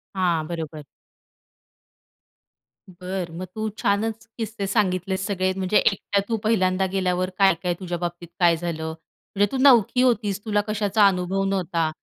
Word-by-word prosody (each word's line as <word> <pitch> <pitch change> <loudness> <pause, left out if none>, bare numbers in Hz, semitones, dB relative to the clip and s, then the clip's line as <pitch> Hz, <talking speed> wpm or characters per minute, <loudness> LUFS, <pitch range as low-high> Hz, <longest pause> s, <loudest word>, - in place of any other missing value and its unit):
हां, 170 -4 +1
बरोबर. 160 -2 -6 2.1
बरं, 180 -1 -5
मग 185 - -4
तू 220 0 -2
छानच 220 +3 -1
किस्से 220 -3 -4
सांगितलेत 190 -2 0
सगळे 190 -1 0
म्हणजे 190 +2 +2
एकट्या 200 0 +1
तू 225 - +1
पहिल्यांदा 190 -3 +2
गेल्यावर 185 -1 0
काय-काय 180 -2 +3
तुझ्या 175 -2 -4
बाबतीत 175 0 -5
काय 170 -2 +5
झालं? 160 -2 -4 0.5
म्हणजे 205 +1 +4
तू 265 - -2
नवकी 250 -2 +5
होतीस 210 -5 +1
तुला 210 -1 +1
कशाचा 210 0 +2
अनुभव 190 +1 0
नव्हता. 180 -4 0
190 Hz, 135 wpm, -23 LUFS, 175-205 Hz, 2.1 s, काय